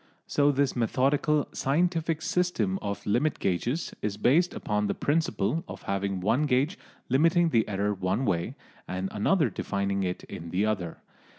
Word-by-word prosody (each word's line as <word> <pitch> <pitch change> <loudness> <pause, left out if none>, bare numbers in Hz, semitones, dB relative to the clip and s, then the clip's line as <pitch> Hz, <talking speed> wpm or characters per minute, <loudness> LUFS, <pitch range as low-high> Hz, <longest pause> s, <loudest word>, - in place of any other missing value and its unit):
So 145 0 +3
this 140 -1 +1
methodical 135 +5 +1
"scientific" 165 +2 0
system 120 - 0
of 100 -1 -4
"limit 125 +9 +1
gauges" 120 - -1
is 105 -1 -2
based 155 +11 +3
upon 105 0 -1
the - - -1
principle 160 - 0
of - - -9
having 100 -1 -2
one 115 +10 +2
gauge 140 +7 +2 0.3
limiting 165 +6 +3
the 115 -7 +2
error 100 +1 0
one 95 +6 -1
way 85 -5 -1 0.3
and 95 +1 -3
another 135 - +2
defining 100 +1 -1
it 90 -1 -2
in 85 - -8
the 95 +5 +1
other. 95 -6 -2
120 Hz, 155 wpm, -28 LUFS, 100-150 Hz, 0.3 s, So